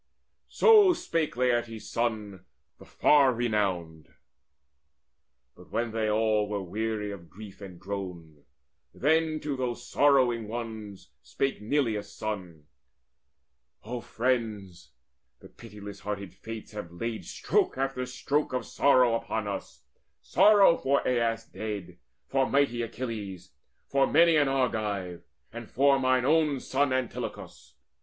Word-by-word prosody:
So 420 -5 +6
spake 165 - -2
Laertes' 120 -3 0
son, 105 -5 -3 0.3
the - - -14
far 140 -3 +4
renowned. 95 -9 -2 1.4
But - - -16
when 115 -1 -2
they 110 -1 -1
all 105 -1 +1
were 100 -2 -2
weary 105 +2 -3
of 85 -4 -10
grief 100 +2 -12
and 90 -3 -10
groan, 90 -6 -7 0.5
Then 155 +2 +2
to 145 -2 -3
those 125 -2 -4
sorrowing 130 -6 +3
ones 110 -3 -7
spake 135 -5 -2
Neleus' 110 -3 -1
son: 90 -8 -6 1.2
"O 120 +2 -5
friends, 110 -8 -2 0.5
the - - -14
pitiless 100 -1 -11
hearted 100 -2 -5
Fates 115 -1 -9
have 105 -5 -7
laid 110 +6 -4
Stroke - - 0
after 135 -1 -1
stroke 140 +3 -1
of 125 -2 -2
sorrow 130 -4 +3
upon 115 -2 -2
us, 100 - -6 0.4
Sorrow 205 -5 +5
for 140 +1 +1
Aias 115 -2 0
dead, 105 -5 -6 0.3
for 135 -1 0
mighty 140 -4 +2
Achilles, 105 -6 -6 0.3
For 135 0 +2
many 165 +1 +5
an 145 -2 +4
Argive, 105 -9 -1 0.3
and - - -8
for 140 +1 +3
mine 130 -1 +2
own 150 -2 +3
son 135 +1 0
Antilochus. 130 -2 -5
115 Hz, 120 wpm, -28 LUFS, 105-135 Hz, 1.4 s, So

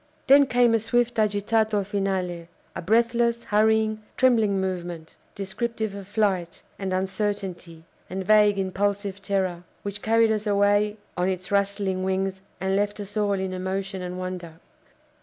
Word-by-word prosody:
Then 275 +1 +7
came 245 -2 +4
a 225 - +4
swift 240 +1 0
agitato 210 0 +1
finale 190 -4 -2 0.3
a - - -4
breathless, 235 +3 +2
hurrying, 215 0 +2 0.2
trembling 225 -6 +3
movement, 175 -3 -4 0.2
descriptive 220 +2 -3
of 200 -2 -8
flight, 195 -5 -1 0.2
and 195 -1 -3
uncertainty, 190 -3 -3 0.3
and 190 +1 -4
vague 210 0 +5
impulsive 200 +1 -1
terror, 185 -3 -1 0.2
which 205 0 -5
carried 225 0 +3
us 215 0 -1
away 205 +1 +2 0.2
on 180 +1 +1
its 185 0 -4
rustling 200 -2 0
wings, 190 0 -1 0.2
and 190 +1 0
left 205 +1 0
us 205 0 -8
all 205 -1 +1
in 190 -1 -2
emotion 190 +1 -3
and 180 0 -5
wonder. 185 -2 -5
200 Hz, 140 wpm, -25 LUFS, 190-215 Hz, 0.3 s, Then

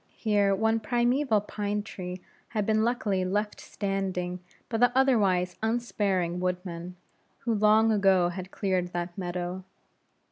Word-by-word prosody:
Here 205 -3 +2
one 220 +2 +2
primeval 240 0 +2
pine 205 0 -3
tree 185 -3 -7 0.3
had 210 -3 -2
been 220 0 +2
luckily 220 -5 0
left 205 +3 -2
standing 190 -3 -3 0.3
by 225 -2 -2
the 245 0 +5
otherwise 200 -9 +3
unsparing 205 -6 0
woodmen, 180 -1 -3 0.5
who 230 - 0
long 215 +1 +4
ago 195 -4 +4
had 185 +1 -6
cleared 185 -3 -1
that 175 0 -3
meadow. 180 0 -4
200 Hz, 130 wpm, -28 LUFS, 180-220 Hz, 0.5 s, the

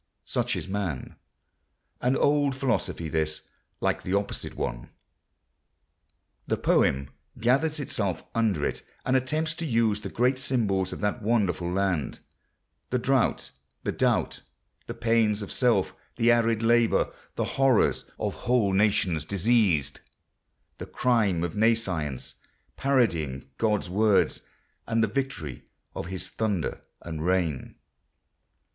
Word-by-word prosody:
Such - - 0
is - - -4
man.... 95 -9 -3 0.9
An 125 +2 +2
old 145 -1 +2
philosophy 125 - -1
this—like 80 -1 -3
the 90 - -1
opposite 100 0 -3
one. - - -4 1.6
The - - 0
poem 70 +1 +2 0.3
gathers 145 +7 +2
itself 100 - -2
under 105 -10 +1
it - - -3 0.2
and 130 - +2
attempts 155 +5 0
to 165 0 -5
use 115 -4 +2
the 100 - -5
great 125 +4 +1
symbols 105 -9 0
of - - -6
that 105 +3 -1
wonderful 100 -6 +1
Land, 90 -7 0 0.7
the 125 - +1
drought, 130 0 +1 0.3
the - - -1
doubt, - - 0 0.5
the - - -5
pains 110 -2 +2
of 100 - -7
self, 115 -7 +2 0.2
the 115 +1 +4
arid 115 -1 +2
labour, 120 0 +3 0.2
the - - 0
horrors 135 -4 +2
of - - -2
whole 115 -6 +1
nations 95 -5 +2
diseased, 100 - +2 0.8
the - - -6
crime 105 -9 +1
of 85 -2 -3
Nescience, 95 - 0 0.4
parodying 85 - 0
God's 105 -4 +1
words, 100 +2 +2 0.5
and 115 0 +2
the - - +3
victory 105 - -4 0.3
of - - -4
His 95 0 -4
thunder 105 -7 -2 0.2
and 80 -2 -5
rain. 85 -6 0
105 Hz, 125 wpm, -27 LUFS, 90-120 Hz, 1.6 s, the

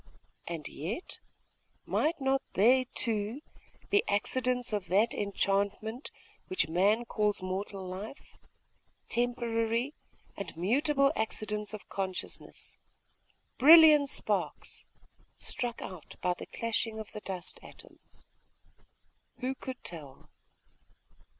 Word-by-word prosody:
And 165 -4 -4
yet 200 - -5 0.7
might 320 +2 +1
not 270 0 +2
they, 255 +6 +5
too, 225 +3 -1 0.5
be 405 0 +6
accidents 250 +3 0
of 200 -4 -1
that 210 +6 +3
enchantment, 200 +4 -1 0.4
which 185 - +1
man 200 +8 +3
calls 210 -4 0
mortal 190 +1 -4
life; 195 +9 -8 0.7
temporary 235 +1 0 0.4
and 190 -5 -7
mutable 275 - +3
accidents 210 -1 -2
of 205 - -11
consciousness; 190 -2 -5 0.8
brilliant 305 0 +9
sparks, - - -1 0.5
struck 240 -1 -3
out 185 -5 -9
by 180 -1 +1
the - - -9
clashing 225 -1 -2
of 220 -1 -7
the 210 - -7
dust 185 -3 -6
atoms? - - -15 1.2
Who 255 +1 0
could 260 -1 -8
tell? 145 -6 -9
220 Hz, 100 wpm, -31 LUFS, 195-255 Hz, 1.2 s, brilliant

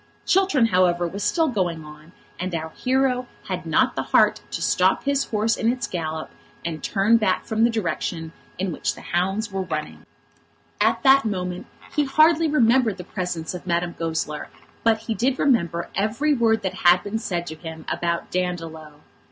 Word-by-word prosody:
Chiltern, 375 -10 +3
however, 180 -4 +2
was 200 +4 -5
still 325 -2 +2
going 175 -8 -2
on, 150 +2 -13 0.3
and 180 -1 -3
our 160 0 -3
hero 255 +1 0 0.2
had - - -4
not - - +2
the - - -1
heart - - +3
to - - -4
stop - - +2
his 280 -1 +1
horse 220 +1 0
in 230 - +1
its 250 0 -3
gallop 160 -3 -4 0.3
and 160 -3 -4
turn 210 +3 +3
back 200 -5 0
from 220 0 0
the 235 - +5
direction 170 -6 -3 0.3
in 190 0 -2
which - - -2
the - - -11
hounds 195 +5 -1
were 195 0 -2
running. 155 -4 -5 0.7
At - - +2
that 275 0 +6
moment 180 -4 -3 0.3
he 295 - +2
hardly 310 +4 +4
remembered 245 -6 +3
the 180 - -7
presence 180 -3 -4
of 180 0 -8
Madame 170 0 0
Goesler, 160 -2 -3 0.4
but 225 -1 +3
he 225 0 -3
did 255 +4 0
remember 170 - +1
every 230 +10 +1
word 225 -4 +2
that 190 - -2
had 175 +1 +6
been 205 +2 -3
said 175 -5 -3
to 160 - -6
him 160 -1 -9
about 170 0 -2
Dandolo. 165 -4 -4
190 Hz, 175 wpm, -23 LUFS, 170-235 Hz, 0.7 s, that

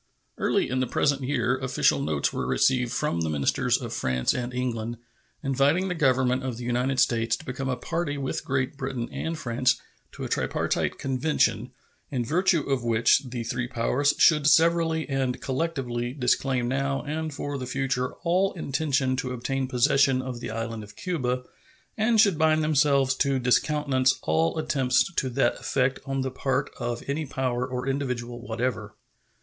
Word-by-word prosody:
Early - - +1
in 130 - -1
the 130 - 0
present 140 -1 +1
year 125 -2 0
official 130 - +2
notes 75 0 0
were - - -2
received 125 -2 +2
from 85 -8 -1
the 80 - -1
ministers 70 -3 +1
of - - -6
France 65 -1 0
and 125 0 -3
England 120 -2 -3 0.5
inviting 140 +8 +2
the - - 0
Government 130 -5 +2
of 130 -3 -3
the 125 - -7
United 125 +2 0
States 115 -1 +2
to - - -13
become 130 +1 -4
a 130 - 0
party 165 -4 -2
with 135 -1 -3
Great 135 +1 -1
Britain 130 -3 -3
and 165 0 -3
France 130 -2 +1 0.3
to - - -7
a - - -2
tripartite - - -1
convention, 135 +4 0 0.4
in 125 -4 -2
virtue 175 +4 +2
of 135 -3 0
which 115 +3 +3
the 120 -1 -4
three 120 +1 -2
powers 130 +4 +1
should 150 -3 +5
severally 165 0 +3
and 135 -3 -1
collectively 130 -5 -2
disclaim 130 -2 +1
now 135 +2 -1
and 155 +1 -3
for 145 -1 -4
the 125 - -5
future 125 -1 -1
all 185 +3 +2
intention 135 -4 0
to 125 0 -2
obtain 130 +2 -2
possession 135 +1 +3
of 130 -2 -5
the - - -5
island 115 0 -4
of 105 - -13
Cuba, 130 -9 -2 0.5
and 220 +1 +2
should 200 -7 +4
bind 155 0 +3
themselves 140 -3 +3
to 140 -1 +2
discountenance 130 +1 +2
all 80 +1 +1
attempts 135 +3 +1
to 130 - 0
that 120 -1 +1
effect 130 0 0
on 135 0 -1
the 130 0 -2
part 135 +2 -1
of 120 -1 -3
any 145 +2 -2
power 125 -2 -1
or 125 0 -4
individual 125 -3 -3
whatever. 115 -2 -3
130 Hz, 170 wpm, -26 LUFS, 125-145 Hz, 0.5 s, should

